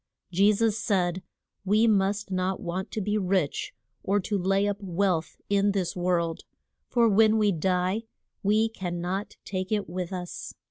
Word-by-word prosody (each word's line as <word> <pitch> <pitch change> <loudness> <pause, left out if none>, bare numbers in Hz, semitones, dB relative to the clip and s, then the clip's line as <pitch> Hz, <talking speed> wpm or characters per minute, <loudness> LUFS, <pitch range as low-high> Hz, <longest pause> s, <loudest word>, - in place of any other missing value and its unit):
Je 200 +4 +5
sus 220 +1 +1
said 185 -4 0 0.4
we 210 +3 +3
must 205 -1 +1
not 185 0 0
want 180 +2 -4
to - - -4
be 210 +1 0
rich 185 -6 0 0.3
or 200 +2 +1
to 205 +2 -2
lay 195 +1 +2
up 205 0 -2
wealth 180 -4 0
in 200 0 +2
this 190 -4 -1
world, 175 -2 0 0.4
for 235 -2 +3
when 220 +1 +5
we 210 -2 +3
die 185 +4 0 0.4
we 215 +2 +3
can 180 -6 -5
not 185 +4 -3
take 185 0 -3
it 210 -2 0
with 180 +2 -4
us. 180 -2 -6
195 Hz, 165 wpm, -27 LUFS, 180-205 Hz, 0.4 s, Je